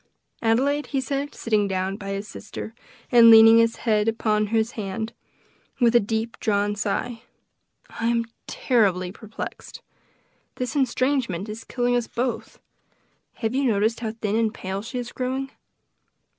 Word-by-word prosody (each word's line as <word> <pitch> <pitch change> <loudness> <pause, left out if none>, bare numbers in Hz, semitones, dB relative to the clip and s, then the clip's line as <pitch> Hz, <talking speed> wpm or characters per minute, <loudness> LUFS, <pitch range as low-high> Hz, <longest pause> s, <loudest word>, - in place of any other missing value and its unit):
Adelaide," 270 +6 +1
he 275 - -1
said, 280 +2 -3
sitting 215 -3 +1
down 190 0 -2
by 200 -1 -7
his 200 +1 -4
sister, 220 +1 -8 0.4
and 235 -1 +8
leaning 225 0 +9
his 230 0 +3
head 215 -2 +2
upon 215 -1 +1
his 225 +2 0
hand, 220 +2 -4 0.7
with 240 -2 +4
a - - +8
deep 225 +2 -3
drawn 205 -1 +1
sigh, 225 +3 -2 0.7
"I 230 - -4
am 235 0 +1 0.2
terribly 190 -8 +1
perplexed! 215 +2 -8 0.7
This 250 +3 -4
estrangement 255 -7 0
is 215 +2 -7
killing 245 -1 0
us 240 -1 0
both. 245 -1 -3 0.7
Have 225 0 -3
you 275 +1 +1
noticed 220 0 +1
how 220 -2 -3
thin 215 -2 -2
and 225 -1 +1
pale 190 -1 -5
she 230 +4 -6
is 240 -1 -4
growing? 265 +1 -3
225 Hz, 145 wpm, -24 LUFS, 210-245 Hz, 0.7 s, leaning